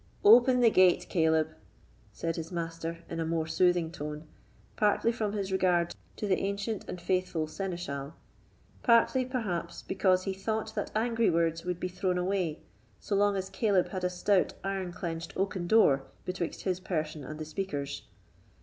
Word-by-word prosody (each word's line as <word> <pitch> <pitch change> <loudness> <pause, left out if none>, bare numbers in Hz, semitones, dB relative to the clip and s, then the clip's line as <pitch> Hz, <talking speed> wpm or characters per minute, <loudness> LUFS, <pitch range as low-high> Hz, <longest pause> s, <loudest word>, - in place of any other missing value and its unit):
"Open 245 +4 +7
the 230 -2 +6
gate, 185 -3 +5
Caleb," 160 -2 +2 0.6
said 165 -1 -3
his 165 0 -5
master, 165 -1 -4
in 165 - -5
a - - +1
more 160 0 -1
soothing 170 0 +2
tone, 150 0 -6 0.5
partly 210 +2 +2
from 215 -3 -2
his 200 -2 -2
regard 180 -2 +2 0.2
to - - -4
the 190 -2 +2
ancient 200 +2 -2
and 180 - -5
faithful 180 -3 0
seneschal, 160 -5 -5 0.7
partly 245 +2 +4
perhaps 225 -10 -3
because 185 -1 +2
he 195 - -2
thought 220 +3 -3
that - - -3
angry 230 +1 +2
words 165 -1 +1
would 180 -1 -2
be 185 - -2
thrown 180 0 -1
away, 180 -3 -1 0.4
so - - -4
long 205 0 +3
as 190 -1 -3
Caleb 200 -5 +2
had 185 -2 -4
a 180 - +2
stout 185 +2 +1
iron 195 -2 -2
clenched 170 -2 -5
oaken 190 -2 -1
door 140 -11 +4 0.2
betwixt 180 -2 -3
his 185 -2 -1
person 155 -5 -3
and 155 +3 -7
the 155 - -4
speakers. 145 -5 -4
180 Hz, 165 wpm, -30 LUFS, 165-200 Hz, 0.7 s, Open